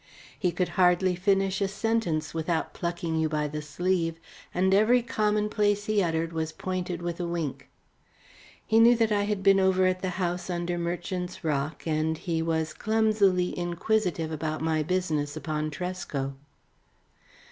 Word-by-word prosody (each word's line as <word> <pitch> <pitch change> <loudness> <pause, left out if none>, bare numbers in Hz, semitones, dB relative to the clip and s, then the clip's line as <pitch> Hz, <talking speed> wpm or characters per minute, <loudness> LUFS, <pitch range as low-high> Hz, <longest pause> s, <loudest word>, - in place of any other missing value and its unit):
He 180 -4 +1
could 180 +1 -1
hardly 180 +1 +4
finish 195 +1 +1
a 195 - +2
sentence 200 -6 -1
without 165 0 -1
plucking 170 -2 -2
you 160 0 +1
by 150 -1 0
the 150 +1 -5
sleeve, 165 +2 -1 0.3
and 190 +1 +2
every 230 +5 +4
commonplace 210 -2 +1
he 215 -1 +2
uttered 165 -1 -1
was 160 -1 -2
pointed 180 -1 -4
with 175 0 -3
a 175 - -2
wink. 170 -5 -4 1.0
He 225 0 +3
knew 235 +1 +7
that 225 -2 +1
I 205 -1 +2
had 205 -2 -2
been 195 0 +6
over 190 0 +3
at 185 0 +1
the 185 - -1
house 180 0 -2
under 175 0 -2
Merchant's 180 +2 -4
Rock, 150 -1 -2
and 160 0 0
he 165 -1 -2
was 160 -1 -1
clumsily 215 -5 +2
inquisitive 175 -1 -1
about 155 0 -3
my 160 -1 +1
business 155 -3 -1
upon 155 -1 -2
Tresco. 155 -5 -4
175 Hz, 155 wpm, -27 LUFS, 160-195 Hz, 1.0 s, knew